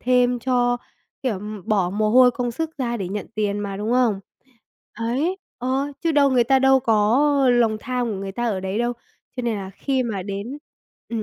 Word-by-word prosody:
thêm 250 0 +2
cho, 245 0 +1 0.5
kiểu, 220 -8 -1 0.3
bỏ 195 -4 +1
mồ 215 +2 0
hôi, 250 +1 +7
công 245 0 -2
sức 320 +7 -3
ra 240 -3 -1
để 190 -4 -4
nhận 205 +1 -4
tiền 205 -1 -1
mà, 200 -1 -4
đúng 210 +4 -2
không? 240 -6 +2 0.7
Ấy, 265 +11 -1 0.2
ờ, 265 +3 -1
chứ 330 -2 +1
đâu 280 -1 +4
người 250 -2 +4
ta 265 +2 +4
đâu 265 0 +5
có 225 +5 +3 0.2
lòng 230 -3 +3
tham 250 0 -2
của 205 - -3
người 195 0 -5
ta 240 +4 -2
ở 190 -3 -1
đấy 190 +2 -3
đâu. 240 +1 0 0.4
Cho 250 - -2
nên 235 -2 -1
là 195 -1 -6
khi 265 +6 -1
mà 215 -6 -3
đến 205 +8 -5 0.5
ừm 225 -2 -3
240 Hz, 205 wpm, -22 LUFS, 210-255 Hz, 0.7 s, hôi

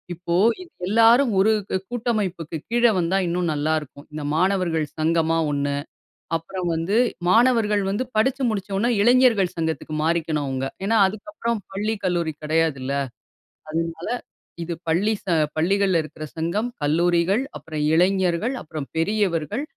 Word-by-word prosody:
இப்போ 170 0 -3 0.3
இது 360 - -12 0.2
எல்லாரும் 230 +4 +5
ஒரு 210 +3 +4 0.2
கூ - - +1
கூட்டமைப்புக்கு 210 -9 -2
கீழ 240 +1 +1 0.2
வந்தா 175 +2 +1
இன்னும் 170 -1 0
நல்லாருக்கும். 150 -1 -2
இந்த 150 -1 -5
மாணவர்கள் 180 -3 +1
சங்கமா 165 +1 +2
ஒண்ணு. 140 0 -1 0.6
அப்புறம் 175 +2 -3
வந்து 165 +6 -1 0.3
மாணவர்கள் 225 -2 +3
வந்து 205 +6 -1
படிச்சு 260 +5 +1
முடிச்ச 205 -3 -3
ஒண்ணே 230 +5 +1
இளைஞர்கள் 235 -5 +4
சங்கத்துக்கு 160 -1 -3
மாறிக்கணும் 160 -3 0
அவுங்க. 135 0 -2 0.2
ஏன்னா 225 +3 +2
அதுக்கப்புறம் 230 +2 -4
பள்ளி 210 +3 -1
கல்லூரி 170 -3 0
கிடையாதுல்ல. 150 -4 0 0.8
அதனால 165 +1 -3 0.6
இது 170 +1 -4 0.2
பள்ளி 195 +7 +2
ச - - -35 0.3
பள்ளிகள்ல 190 +2 +2
இருக்குற 155 0 -8
சங்கம், 185 +9 -1
கல்லூரிகள், 175 - +2
அப்புறம் 155 -2 -5
இளைஞர்கள், 190 +6 +2
அப்புறம் 150 -2 -6
பெரியவர்கள் 200 - 0
175 Hz, 125 wpm, -23 LUFS, 160-215 Hz, 0.8 s, எல்லாரும்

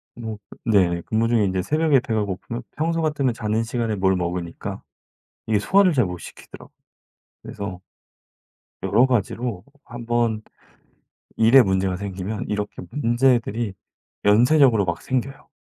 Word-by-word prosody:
뭐 110 -2 -6 0.3
네네. 90 -6 +3
근무 115 +1 0
중에 115 -3 +2
인제 95 -1 0
새벽에 155 - +2
배가 110 -4 -1
고프면 110 +5 -6
평소 165 +2 0
같으면 140 -6 0
자는 110 0 -1
시간에 115 -2 -2
뭘 95 -1 +2
먹으니까 85 -1 -4 0.7
이게 110 -2 +2
소화를 190 - +4
잘 125 -5 +3
못 90 -1 -5
시키더라고요. - - -13 0.7
그래서 95 -3 -7 1.0
여러 125 - +4
가지로 120 -4 -2 0.2
1 120 0 -9
번 115 -2 0 1.0
일에 115 +4 +7
문제가 95 -2 0
생기면 100 +1 -5
이렇게 105 0 -4
문제들이 120 -5 +1 0.5
연쇄적으로 120 +1 +5
막 85 -2 -3
생겨요. 135 +1 -3
110 Hz, 300 characters per minute, -22 LUFS, 100-125 Hz, 1.0 s, 일에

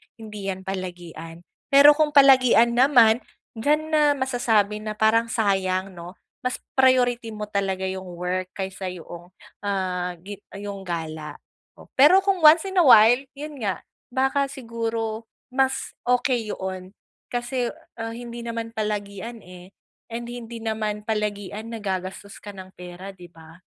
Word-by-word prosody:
hindi 210 -3 -8
'yan 190 -1 -4
palagian. 175 -3 -7 0.2
Pero 280 +1 +8
kung 300 0 +1
palagian 255 -4 +6
naman, 240 -3 +5 0.4
diyan 295 +7 +2
na 310 -1 +3
masasabi 235 -6 +1
na 215 0 -3
parang 220 +2 +3
sayang, 190 -3 0
'no? 175 +1 -9 0.3
Mas 250 - -1 0.2
priority 250 -3 +3
mo 210 -1 -5
talaga 195 -2 -2
yung 185 -2 -6
work 180 +1 -2
kaysa 190 -1 -4
yung, 175 0 -10 0.3
ah, 185 -3 -2
gi 200 0 -8 0.2
yung 200 -1 -6
gala. 160 -2 -5 0.4
Oh, - - -14
pero 295 +8 +7
kung 390 -3 +1
once 315 +3 +7
in 380 - +2
a - - +6
while, 240 -1 +7 0.2
'yon 300 +1 -7
nga, 200 -3 -1 0.3
baka 270 +2 +1
siguro 230 -3 -4 0.2
mas 265 +1 0 0.2
okey 245 -2 +1
'yon 190 +1 -6 0.4
kasi, 245 0 -2 0.3
uh, 225 0 -4
hindi 235 0 -8
naman 230 -1 -5
palagian, 210 +1 -4
eh, 180 -1 -14 0.4
and 235 +1 -5
hindi 235 -1 -8
naman 215 -2 -2
palagian 210 0 -3
na 230 - -5
gagastos 190 0 -5
ka 205 - -7
ng 190 -1 -11
pera, 180 +2 -9
'di 175 -2 -14
ba? 160 -1 -15
215 Hz, 145 wpm, -24 LUFS, 190-245 Hz, 0.4 s, Pero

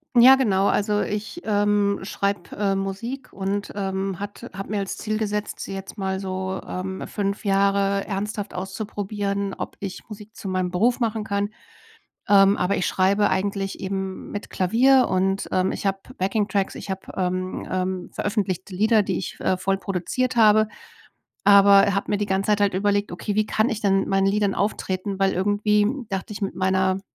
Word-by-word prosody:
Ja, 255 +3 +9
genau. 200 -7 +2
Also, 210 0 +1
ich, 215 +12 -4
ähm, 205 -1 +2
schreibe, 200 -1 -3
äh, 200 -1 +1
Musik 200 +8 -4
und, 200 +1 -3
ähm, 195 -2 -2
hat 205 0 -7
habe 195 +1 -6
mir 205 - 0
als 195 - -4
Ziel 215 -1 -2
gesetzt, 210 -1 -3
jetzt 195 +2 -7
mal 190 -1 -2
so, 190 0 -3
ähm, 190 +1 -4
5 200 0 -3
Jahre 195 0 +2
ernsthaft 205 +1 -3
auszuprobieren, 200 +1 -3
ob - - -6
ich 195 -2 -6
Musik 210 +1 -11
zu 195 - -7
meinem 185 -1 -1
Beruf 235 +8 +2
machen 225 -2 -1
kann. 200 -1 -1 0.8
Ähm, 200 0 +6
aber 180 +2 +1
ich 185 - 0
schreibe 200 +2 +2
eigentlich 195 0 -2
eben 190 0 -4
mit 205 - -6
Klavier 250 +8 +4
und, 190 +1 0
ähm, 185 +1 +2
ich - - -4
habe 195 0 +1 0.2
Backing-Tracks. 195 0 0
Ich - - -8
habe, 190 0 -5
ähm, 185 0 -2
ähm, 185 -1 -2
veröffentlichte 195 -3 -2
Lieder, 215 +2 +4
die 190 -2 -2
ich 185 - -5
v - - -9
äh, 185 - +2
voll 195 +1 0
produziert 215 +7 -2
habe. 215 -1 +5 0.8
Aber 200 0 +7
habe 195 - -2
mir 205 - +1
die 205 - -1
ganze 195 +1 -1
Zeit 210 -1 +3
halt 200 -2 +2
überlegt: 205 +1 +1
„Okay, 200 +3 -3
wie 215 0 +2
kann 215 +2 +1
ich 220 -1 -3
denn 195 -1 +2
meinen 195 0 +2
Liedern 200 0 +1
auftreten?“ 195 -1 -2
Weil 195 -1 +2
irgendwie 205 +2 +2 0.2
dachte 195 +2 -3
ich 205 - -7
mit 195 - -2
meiner 190 0 +1
200 Hz, 175 wpm, -23 LUFS, 190-210 Hz, 0.8 s, Ja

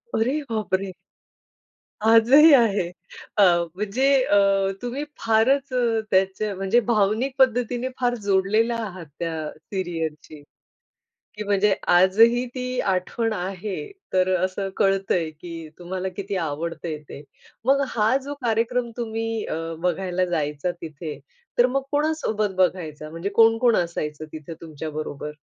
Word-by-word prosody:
अरे 260 +7 +1
बापरे! 195 -3 -1 1.1
आजही 255 +8 +7
आहे. 210 -8 +4 0.5
अ, 205 - +6 0.3
म्हणजे 210 +6 -1 0.2
अ, 205 - +2 0.5
तुम्ही 250 +4 -3 0.2
फारच 255 +5 +2
अ, 235 -3 +1
त्यांच्या 195 +2 +1
म्हणजे 195 +5 +2
भावनिक 220 +5 +2
पद्धतीने 245 0 +2
फार 245 -1 +1
जोडलेला 210 +4 +2
आहात 185 -5 -7
त्या 160 -2 -3
सीरियलशी, 165 -4 -5 1.0
की 210 0 -5
म्हणजे 200 0 +2
आजही 220 +7 +5
ती 250 0 -2
आठवण 195 +4 -1
आहे. 195 - -4 0.2
तर 185 0 +2
असं 190 +2 -2
कळतंय, 195 -4 +1
की 165 0 -9
तुम्हाला 185 +2 -4
किती 200 0 -4
आवडतंय 165 0 -3
ते. 140 - -9 0.4
मग 275 +2 +4
हा 225 +3 +2
जो 285 +1 -5
कार्यक्रम 235 +1 0
तुम्ही 225 -1 -3
अ, - - -3 0.3
बघायला 180 +1 0
जायचा 150 +1 -1
तिथे, 155 -1 -7 0.4
तर 245 - +7
मग 270 +2 -1
कोणासोबत 290 -10 0
बघायचा? 160 -5 -1
म्हणजे 165 +4 -4
कोण-कोण 225 +1 +5
असायचं 155 -3 -2
तिथे 155 +1 -8
तुमच्या 155 -1 -6
बरोबर? 150 -1 -5
195 Hz, 125 wpm, -24 LUFS, 175-235 Hz, 1.1 s, आजही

